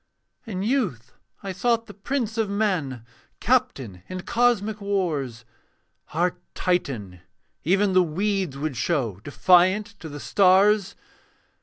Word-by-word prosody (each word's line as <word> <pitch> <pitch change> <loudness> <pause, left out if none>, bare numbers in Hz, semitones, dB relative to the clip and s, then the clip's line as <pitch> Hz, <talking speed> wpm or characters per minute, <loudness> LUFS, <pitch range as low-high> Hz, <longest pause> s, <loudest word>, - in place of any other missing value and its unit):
In 190 -3 -3
youth 190 - -1 0.3
I 195 - -4
sought 230 +4 0
the 205 - -11
prince 230 +1 -3
of 225 -3 0
men, 180 - -1 0.3
Captain 135 - 0
in 185 0 -5
cosmic 220 -2 +1
wars, 155 - -2 0.7
Our 175 +2 +1 0.2
Titan, 120 - -2 0.4
even 195 +3 +2
the 185 - +6
weeds 185 -2 -1
would 150 -1 -3
show 120 - -1
Defiant, 185 - +3
to 160 - -8
the 145 0 -8
stars. 200 +3 +3
185 Hz, 120 wpm, -24 LUFS, 145-210 Hz, 0.7 s, the